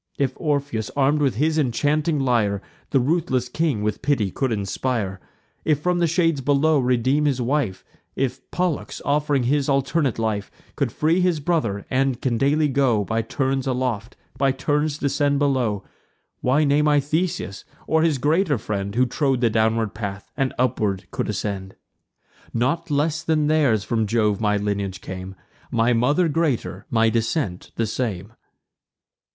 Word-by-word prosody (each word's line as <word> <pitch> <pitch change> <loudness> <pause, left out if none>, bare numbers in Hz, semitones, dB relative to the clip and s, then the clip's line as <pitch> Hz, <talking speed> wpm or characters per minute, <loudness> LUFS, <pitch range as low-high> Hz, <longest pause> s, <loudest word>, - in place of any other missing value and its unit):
If 135 -2 0
Orpheus, 140 -8 -1
arm'd 145 +2 +2
with 135 -5 +2
his 155 +5 +1
enchanting 150 +4 +1
lyre, 115 -7 +1 0.3
The 135 - +3
ruthless 130 -3 0
king 150 -8 -1
with 105 0 -2
pity 120 -10 +1
could 130 +5 -1
inspire, 100 -1 -2 0.4
And 155 -2 +2
from 175 +4 0
the 170 - +3
shades 165 -3 +1
below 145 +3 +3
redeem 130 +3 +2
his 140 -3 +1
wife; 125 -6 -1 0.3
If 130 0 -3
Pollux, 180 -4 -2
off'ring 145 -2 +1
his 140 +3 +1
alternate 140 0 +1
life, 110 -3 -1 0.3
Could - - -1
free 165 +4 +2
his 180 -3 +2
brother, 125 - -1
and 130 -1 +1
can 120 -3 -1
daily 150 +3 +3
go 130 -7 +2
By 115 +2 0
turns 135 +3 -1
aloft, 125 -3 -2 0.2
by 135 0 +3
turns 145 +2 0
descend 145 0 +1
below: 130 -8 +1 0.6
Why 135 +5 +2
name 150 +1 +3
I 145 -1 +4
Theseus, 150 - -2 0.2
or 160 0 +2
his 160 -3 +2
greater 150 +2 +2
friend, 100 -1 -4
Who 125 +1 +4
trod 135 +1 0
the 115 -2 +3
downward 110 -1 +1
path, 100 -2 -6
and 135 -2 0
upward 110 -6 0
could - - -2
ascend? 95 -2 -4 0.8
Not 155 +9 0
less 150 +2 +1
than 155 -2 +1
theirs 145 -9 +3
from 110 -1 0
Jove 105 -2 +1
my 105 -1 +2
lineage 100 -2 -2
came; 95 0 -7 0.3
My 115 +1 +2
mother 145 +9 +2
greater, 145 - -1
my 115 -1 +3
descent 115 - -1
the 115 - 0
same." 105 -3 -3
130 Hz, 155 wpm, -23 LUFS, 110-150 Hz, 0.8 s, I